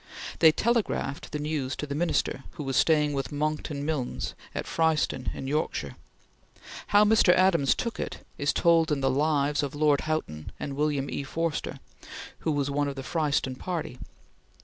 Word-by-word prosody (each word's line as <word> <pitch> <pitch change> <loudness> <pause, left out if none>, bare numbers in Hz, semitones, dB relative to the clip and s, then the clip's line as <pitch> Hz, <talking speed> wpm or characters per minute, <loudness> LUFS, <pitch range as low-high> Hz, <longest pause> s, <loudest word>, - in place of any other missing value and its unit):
They 160 - +8
telegraphed 215 - -1
the 150 - -2
news 150 -3 -2
to - - -4
the 140 - -5
Minister, 155 -3 0
who 150 - -6
was 135 -1 -2
staying 150 -2 +3
with 135 +1 -3
Monckton 150 -1 -2
Milnes 150 -5 -2 0.2
at - - -3
Fryston 160 -5 +1
in - - -6
Yorkshire. 135 - -2 0.9
How 205 +1 +5
Mr. 215 -4 +5
Adams 170 -7 +4
took 235 -2 -3
it, - - -5
is 145 - +1
told 165 -1 +3
in 145 -2 0
the 135 0 +2
"Lives" 145 +1 +1
of 145 -1 -4
Lord 145 -1 +3
Houghton 155 - -3
and 140 - -4
William 145 -1 0
E. - - -3
Forster 165 +3 -3 0.6
who 160 - -1
was 145 -1 0
one 145 +1 0
of 140 - -4
the 135 - -6
Fryston 145 -4 0
party. 165 -8 -4
150 Hz, 170 wpm, -27 LUFS, 140-160 Hz, 0.9 s, They